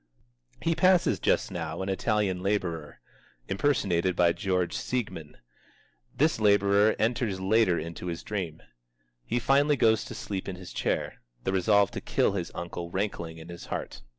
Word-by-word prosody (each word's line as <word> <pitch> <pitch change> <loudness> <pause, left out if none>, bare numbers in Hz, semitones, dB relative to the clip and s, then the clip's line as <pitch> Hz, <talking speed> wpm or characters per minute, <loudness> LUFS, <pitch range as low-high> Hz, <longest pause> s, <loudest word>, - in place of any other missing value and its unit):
He 165 - +2
passes 185 +1 +3
just - - +1
now 85 0 -4
an - - -4
Italian 95 -2 0
laborer 90 -6 -2 0.5
(impersonated 95 -7 +1
by 85 -1 +4
George 90 -2 -1
Seigmann). 95 -12 -4 0.8
This 155 -3 +2
laborer 100 0 +4
enters 110 -3 0
later 95 -1 +3
into 85 +2 -6
his 85 -1 -4
dream. 90 -7 -4 0.6
He - - 0
finally 140 +4 +3
goes 110 -3 +3
to - - -8
sleep 95 -2 -4
in 95 - -4
his 90 0 -10
chair, - - -2 0.2
the 95 - -1
resolve 100 +1 +3
to - - -5
kill - - +1
his 90 -4 -3
uncle 85 0 -5
rankling 85 -4 -3
in 80 +1 -11
his 85 0 -9
heart. - - -5
95 Hz, 150 wpm, -28 LUFS, 85-110 Hz, 0.8 s, by